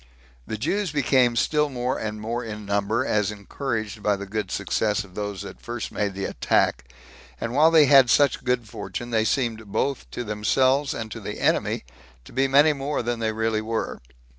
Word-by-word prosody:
The 110 Hz, -, -3 dB
Jews 180 Hz, -, -1 dB
became 130 Hz, -4 st, +3 dB
still 150 Hz, +5 st, +2 dB
more 125 Hz, -1 st, -2 dB
and 110 Hz, -1 st, -4 dB
more 115 Hz, +3 st, -3 dB
in 105 Hz, -2 st, -7 dB
number, 100 Hz, +4 st, 0 dB
as 105 Hz, -1 st, +1 dB
encouraged 110 Hz, 0 st, -4 dB
by 105 Hz, -1 st, +2 dB
the 100 Hz, 0 st, -6 dB
good 105 Hz, -1 st, -3 dB
success 105 Hz, +2 st, 0 dB
of 95 Hz, -2 st, -16 dB
those 105 Hz, 0 st, -4 dB
that -, -, -10 dB
first 120 Hz, -1 st, -5 dB
made 100 Hz, -2 st, -2 dB
the 95 Hz, -, -3 dB
attack; 60 Hz, -1 st, 0 dB, 0.5 s
and 115 Hz, 0 st, -3 dB
while 155 Hz, +4 st, +6 dB
they 160 Hz, -2 st, +6 dB
had 135 Hz, -3 st, +7 dB
such 140 Hz, +3 st, +3 dB
good 125 Hz, -2 st, 0 dB
fortune, 105 Hz, +4 st, -6 dB
they 110 Hz, -1 st, +2 dB
seemed 110 Hz, -3 st, -1 dB
both 135 Hz, +7 st, -2 dB
to 120 Hz, -, -5 dB
themselves 130 Hz, +6 st, +1 dB
and 110 Hz, -1 st, -5 dB
to -, -, -6 dB
the -, -, -6 dB
enemy -, -, +1 dB, 0.4 s
to -, -, -14 dB
be 135 Hz, +2 st, +2 dB
many 145 Hz, +3 st, +5 dB
more 140 Hz, -1 st, -2 dB
than 120 Hz, 0 st, -2 dB
they 110 Hz, -1 st, 0 dB
really 110 Hz, 0 st, 0 dB
were. 115 Hz, +1 st, -3 dB
115 Hz, 190 wpm, -24 LUFS, 105-135 Hz, 0.5 s, had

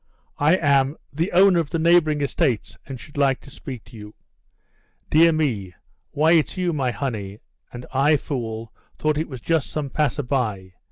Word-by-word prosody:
"I 150 Hz, +5 st, +4 dB
am 140 Hz, -3 st, +2 dB, 0.2 s
the 165 Hz, +6 st, -1 dB
owner 185 Hz, 0 st, +5 dB
of 160 Hz, -3 st, -2 dB
the 165 Hz, -, -1 dB
neighbouring 160 Hz, -2 st, +3 dB
estates, 135 Hz, -, -1 dB
and 135 Hz, -2 st, -7 dB
should 145 Hz, +2 st, -13 dB
like 135 Hz, -2 st, +2 dB
to 140 Hz, -, -14 dB
speak 125 Hz, -3 st, -8 dB
to 115 Hz, +1 st, -16 dB
you." 105 Hz, -1 st, -11 dB, 1.0 s
"Dear 165 Hz, +2 st, +6 dB
me; 115 Hz, -, -1 dB, 0.3 s
why, 155 Hz, +3 st, +2 dB
it's 165 Hz, 0 st, +2 dB
you, 180 Hz, -2 st, 0 dB
my 135 Hz, -4 st, 0 dB
honey; 110 Hz, -7 st, -4 dB, 0.3 s
and 120 Hz, 0 st, -8 dB
I, 145 Hz, +3 st, +4 dB
fool, 115 Hz, -5 st, -5 dB, 0.2 s
thought 155 Hz, -1 st, 0 dB
it 160 Hz, -, -3 dB
was 130 Hz, -4 st, -8 dB
just 165 Hz, 0 st, 0 dB
some 145 Hz, -3 st, -4 dB
passer 145 Hz, -1 st, 0 dB
by. 105 Hz, -8 st, -2 dB
140 Hz, 175 wpm, -22 LUFS, 120-155 Hz, 1.0 s, Dear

